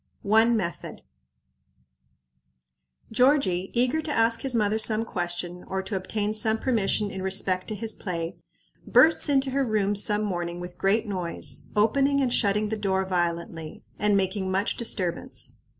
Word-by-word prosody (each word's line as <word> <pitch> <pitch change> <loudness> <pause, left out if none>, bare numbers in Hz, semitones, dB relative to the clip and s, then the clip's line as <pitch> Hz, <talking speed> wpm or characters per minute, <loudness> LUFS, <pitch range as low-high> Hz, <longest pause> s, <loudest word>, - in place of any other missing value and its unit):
One 225 +3 +4
Method. 170 -5 -5 2.1
Georgie, 220 -7 +2
eager 255 +6 +1
to 310 - -5
ask 230 -2 +2
his 265 -3 0
mother 215 -1 +1
some 220 0 +6
question, 175 -2 -3
or 190 0 -3
to 195 +1 -4
obtain 205 +3 -2
some 220 +1 +1
permission 215 -4 0
in 190 - -6
respect 190 -1 0
to 215 - -4
his 220 +2 -2
play, 170 -2 -5 0.5
bursts 320 -1 +4
into 270 -1 +2
her 275 +1 +1
room 210 -4 0
some 210 +1 +2
morning 175 -3 -3
with 180 0 -9
great 205 +5 +2
noise, 170 -8 -3
opening 275 +7 +2
and 255 -3 +1
shutting 210 0 +2
the 220 - -2
door 190 -2 0
violently, 170 -3 -3 0.2
and 205 0 +2
making 190 0 -1
much 190 +3 0
disturbance. 190 -7 -3
205 Hz, 150 wpm, -26 LUFS, 185-225 Hz, 2.1 s, some